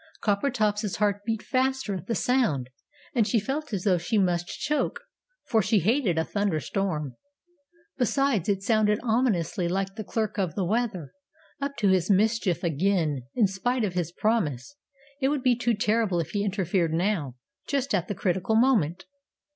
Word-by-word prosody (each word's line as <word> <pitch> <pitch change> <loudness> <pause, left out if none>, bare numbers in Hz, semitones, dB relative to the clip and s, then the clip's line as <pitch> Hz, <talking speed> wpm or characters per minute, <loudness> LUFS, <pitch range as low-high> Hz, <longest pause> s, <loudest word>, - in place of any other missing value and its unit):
Coppertop's 210 -2 0
heart 205 -1 0
beat 225 -1 -2
faster 260 -3 0
at 185 -1 -6
the 230 - -1
sound, 175 - +1 0.4
and 230 -5 +2
she 225 +2 +2
felt 280 +7 -4
as 195 -4 -2
though 185 -4 +3
she 215 +6 -1
must 175 -3 +1
choke, 300 +9 -2 0.5
for 220 -2 +2
she 215 +2 +2
hated 205 - +2
a 160 - +2
thunderstorm. 180 - -2 0.8
Besides, 250 - +1
it 195 -1 0
sounded 210 -1 +3
ominously 220 -8 +1
like 195 +2 -1
the 215 - -4
Clerk 215 +1 -2
of 180 -5 -1
the 190 - 0
Weather, 200 - -1 0.5
up 280 0 -2
to 205 -4 +2
his 185 -1 +2
mischief 205 -2 +2
again, 160 -5 0
in 230 - +4
spite 225 +6 -1
of 195 -4 -1
his 175 -2 -2
promise. 210 - -1 0.5
It 265 - +3
would 285 -2 -1
be 250 -2 +4
too 235 -1 0
terrible 215 -4 +1
if 165 - -3
he 205 -1 -1
interfered 185 -4 0
now 165 - 0 0.3
just 275 -2 -1
at 180 -3 +1
the 205 - -3
critical 190 +4 0
moment. 215 - +2
205 Hz, 165 wpm, -26 LUFS, 180-230 Hz, 0.8 s, in